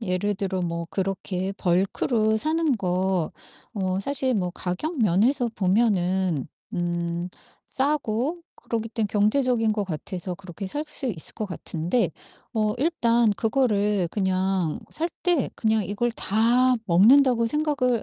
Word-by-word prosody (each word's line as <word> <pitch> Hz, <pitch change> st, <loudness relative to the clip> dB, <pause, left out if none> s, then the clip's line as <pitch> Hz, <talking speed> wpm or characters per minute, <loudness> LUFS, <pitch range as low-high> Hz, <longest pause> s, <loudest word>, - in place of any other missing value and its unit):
예를 205 Hz, 0 st, -1 dB
들어 190 Hz, -1 st, -2 dB
뭐 170 Hz, -1 st, -3 dB
그렇게 190 Hz, 0 st, -2 dB
벌크로 200 Hz, +5 st, +1 dB
사는 310 Hz, +1 st, +1 dB
거 185 Hz, -3 st, 0 dB, 0.4 s
어 190 Hz, -2 st, -1 dB
사실 260 Hz, +2 st, +1 dB
뭐 180 Hz, -4 st, 0 dB
가격 190 Hz, -, -4 dB
면에서 230 Hz, +6 st, +3 dB
보면은 185 Hz, -, +1 dB, 0.3 s
음 175 Hz, 0 st, -2 dB, 0.4 s
싸고 280 Hz, +2 st, 0 dB, 0.2 s
그러기 225 Hz, -1 st, -3 dB
때문에 225 Hz, -1 st, -1 dB
경제적인 225 Hz, +2 st, +2 dB
것 210 Hz, -1 st, -1 dB
같아서 180 Hz, +1 st, -4 dB
그렇게 190 Hz, +1 st, -8 dB
살 290 Hz, +11 st, -3 dB
수 295 Hz, -2 st, -3 dB
있을 180 Hz, -11 st, 0 dB
것 215 Hz, -, -3 dB
같은데 175 Hz, +2 st, -1 dB, 0.4 s
어 215 Hz, -1 st, +1 dB
일단 240 Hz, -7 st, +2 dB
그거를 210 Hz, -5 st, +1 dB
그냥 190 Hz, -4 st, 0 dB
살 330 Hz, +3 st, -2 dB
때 350 Hz, -6 st, +2 dB
그냥 220 Hz, -2 st, +1 dB
이걸 205 Hz, +6 st, -1 dB
다 240 Hz, +5 st, +2 dB
먹는다고 235 Hz, +6 st, +5 dB
생각을 280 Hz, -4 st, 0 dB
210 Hz, 255 characters per minute, -25 LUFS, 185-245 Hz, 0.4 s, 먹는다고